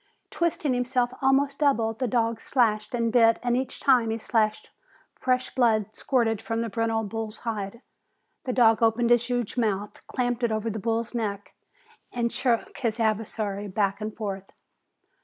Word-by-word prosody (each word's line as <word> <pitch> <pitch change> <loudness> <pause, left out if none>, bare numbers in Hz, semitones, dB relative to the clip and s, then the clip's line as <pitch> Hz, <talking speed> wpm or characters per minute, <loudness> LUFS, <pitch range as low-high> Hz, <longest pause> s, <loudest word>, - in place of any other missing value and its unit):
Twisting 320 -5 0
himself 250 0 0
almost 275 +1 +2
double, 255 -7 +2
the 250 +3 -2
dog 230 -1 0
slashed 215 -3 +1
and 230 -1 0
bit 230 -2 +5
and 240 -1 +1
each 255 0 -3
time 250 -5 +4
he 225 - -1
slashed 215 -2 0 0.4
fresh 255 0 -1
blood 220 -4 +2
spurted 225 -5 0
from 225 0 -2
the 230 -2 -3
brindle 225 0 0
bull's 220 +1 -5
hide. 220 0 -4 0.6
The 255 - -1
dog 230 -3 +4
opened 230 +1 +3
his 240 0 +3
huge 245 -1 -2
mouth, 210 -3 -2
clamped 245 -1 -1
it 235 -2 +1
over 220 +1 -1
the 220 - -4
bull's 230 +3 -2
neck, 205 -4 -3 0.6
and 235 -1 -1
shook 240 -3 0
his 230 -3 -1
adversary 215 -2 -1
back 200 +1 -1
and 215 +1 -3
forth. 195 -3 -6
230 Hz, 160 wpm, -26 LUFS, 215-245 Hz, 0.6 s, bit